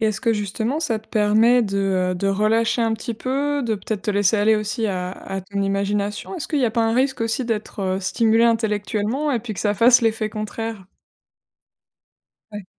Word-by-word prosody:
Et 220 - +2
est-ce 215 0 -1
que, 230 -3 +2
justement, 220 +7 -2
ça 235 -9 -1
te 215 - -20
permet 220 +3 +4
de, 200 -3 -2 0.4
heu, - - -3
de 180 +2 -2
relâcher 225 +4 +1
un 225 - +1
petit 230 +2 -5
peu, 280 +5 -1
de 230 -3 0
peut-être 200 0 -5
te 210 - -1
laisser 205 +1 +2
aller 215 +1 +3
aussi 215 +2 -2
à 180 -2 -3
à 195 0 -6
ton 200 +2 -5
imagination? 200 - -2
Est-ce 325 - -6
qu'il 300 -3 0
y 245 -3 +2
pas 230 +1 +1
un 225 0 +1
risque 260 +1 +1
aussi 230 +3 -1
d'être, 220 -2 -4
heu, 190 0 -1
stimulé 225 +4 +2
intellectuellement 220 +4 0
et 245 - +1
puis 220 -1 -6
que - - -5
ça 205 -1 +1
fasse 235 +4 +6
l'effet 220 -1 +1
contraire? 215 -1 -5 1.7
Ouais. 205 -1 -7
220 Hz, 200 wpm, -22 LUFS, 205-235 Hz, 1.7 s, fasse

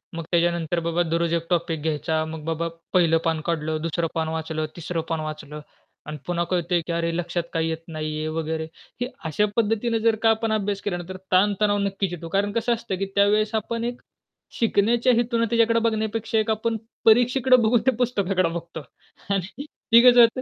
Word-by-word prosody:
मग 165 - -4
त्याच्यानंतर 170 -1 +1
बाबा 170 +1 0
दररोज 170 0 0
एक 165 0 -1
टॉपिक 170 -3 0
घ्यायचा. 160 +1 -1
मग 160 -1 -7
बाबा 165 +1 -1 0.3
पहिलं 170 -3 +4
पान 160 -1 0
काढलं, 160 -2 -1
दुसरं 165 +1 -1
पान 160 -1 0
वाचलं, 160 -1 -3
तिसरं 170 0 -3
पान 165 -1 -1
वाचलं 155 -1 -6 0.5
आणि 150 - -5
पुन्हा 175 -1 0
कळतंय, 175 -1 +1
की - - -2
अरे, 170 0 0
लक्षात 175 0 -2
काही 165 0 0
येत 160 - -2
नाहीये 155 -1 -3
वगैरे. 160 0 -3 0.4
हे 245 - 0 0.2
अशा 160 +7 +1
पद्धतीने 225 +1 +1
जर 225 0 +3
का 225 - +6
आपण 225 0 +1
अभ्यास 205 -1 -1
केला 190 -4 -2
ना 175 - -6
तर 185 - -6
ताणतणाव 205 +2 +3
नक्कीच 195 -2 -1
येतो. 170 -1 -6
कारण 200 +3 0
कसं 230 +2 +1
असतं, 230 -4 -3
की 195 - -1
त्यावेळेस 210 +2 +3
आपण 230 +2 -2
एक 240 +1 -4 0.6
शिकण्याच्या 230 +2 +3
हेतूने 235 0 +1
त्याच्याकडे 230 0 +3
बघण्यापेक्षा 220 0 -1
एक 215 - -1
आपण 225 +1 -1 0.3
परीक्षेकडे 245 +3 +5
बघून 225 +2 +4
ते - - +7
पुस्तकाकडे 195 -7 +1
बघतो 165 -1 -6 0.5
आणि 195 +8 -3 0.3
ते 230 - +10
कसं 245 0 +7
होतं 230 +2 +4
180 Hz, 185 wpm, -24 LUFS, 165-225 Hz, 0.6 s, ते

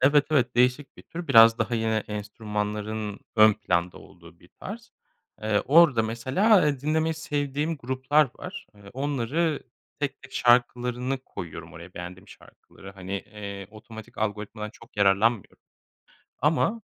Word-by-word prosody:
Evet, 145 +2 +4
evet, 130 -5 +2
değişik 125 +3 +2
bir - - -13
tür. 170 -2 -8
Biraz 115 -3 +8
daha 115 +1 -1
yine 110 -1 0
enstrümanların 105 0 -4 0.2
ön 110 0 +8
planda 90 -4 -1
olduğu 85 -3 -17
bir - - -20
tarz. - - -8 0.5
Eee, 110 -1 +1
orada 145 -5 +6
mesela, 130 - 0
ha, 150 -10 +5
dinlemeyi 160 +3 0
sevdiğim 150 +1 -2
gruplar 130 +2 +1
var. 185 +1 -8
Eee, 100 -1 -15
onları 145 +4 -1 0.4
tek 145 -2 -3
tek 140 - -14
şarkılarını 125 +1 +2
koyuyorum 85 -3 -8
oraya, 85 +3 -12
beğendiğim 90 +3 -9
şarkıları. 95 0 -15
Hani, 95 0 -8
eee, 100 0 -6
otomatik 110 +1 -12
algoritmadan 105 0 -3
çok 115 0 -18
yararlanmıyorum 100 +2 +2 0.8
ama, 165 - +1
115 Hz, 135 wpm, -26 LUFS, 105-140 Hz, 0.8 s, Biraz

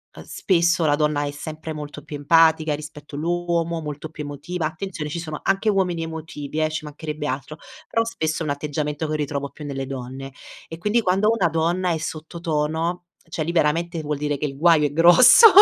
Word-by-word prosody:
a - - -10
spesso 170 -2 +2
la 145 -1 +4
donna 150 -1 +1
è 145 - -2
sempre 155 +2 -7
molto 150 -1 -7
più 150 0 -7
empatica 160 +1 +4
rispetto 150 -1 -10
l'uomo, 170 +1 -1
molto 150 0 -6
più 155 -1 -7
emotiva; 145 +4 -4
attenzione, 160 0 -4
ci 170 - -4
sono 155 -3 -5
anche 195 +3 +1
uomini 180 -5 +1
emotivi 160 -2 -6
eh, 155 - +3
ci 155 0 -4
mancherebbe 150 0 -6
altro; 135 +3 -4 0.3
però 230 - +1
spesso 160 -8 -2
è - - -4
un 145 - -1
atteggiamento 150 +1 -3
che 155 - -2
ritrovo 140 -1 -3
più 150 - -11
nelle 135 -2 -4
donne. 135 0 -7 0.3
E 165 - -8
quindi 210 +6 +2
quando 195 +1 +2
una 225 -6 +2
donna 170 +3 0
è 165 - 0
sotto 160 +1 -6
tono, 165 +2 -1 0.2
cioè 160 -1 -2
liberamente 170 +1 +1
vuol 150 -1 -2
dire 145 0 -1
che 150 - -2
il 135 -1 -8
guaio 160 -1 +5
è - - -7
grosso, 175 - +8
155 Hz, 195 wpm, -23 LUFS, 150-170 Hz, 0.3 s, grosso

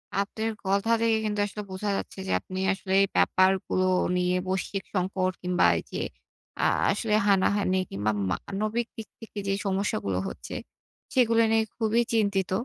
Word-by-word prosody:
আপনের 215 +3 -1
কথা 200 +4 +1
থেকে 225 -1 +3
কিন্তু 210 -1 -1
আসলে 205 +1 -6
বোঝা 195 +2 -3
যাচ্ছে - - -6
যে, - - -1
আপনি 185 0 -6
আসলে 190 0 -4
এই 195 - +4
ব্যাপারগুলো 185 0 +3 0.3
নিয়ে, 180 0 +1
বৈশ্বিক 190 +1 -2
সংকট 185 0 0
কিংবা 180 0 +2
এই - - -4
যে - - -3 0.6
আ - - +4 0.3
আসলে 220 -3 -1
হানাহানি 195 -1 +3
কিংবা 105 +2 -1 0.2
মানবিক 215 - -2
দিক 220 -2 -6
থেকে 220 -2 -8
যে 195 - +2
সমস্যাগুলো 195 - -1
হচ্ছে, - - -7 0.6
সেগুলো 230 -3 +4
নিয়ে 225 0 +4
খুবই 225 0 +2
চিন্তিত। 200 -4 +1
200 Hz, 150 wpm, -27 LUFS, 185-220 Hz, 0.6 s, এই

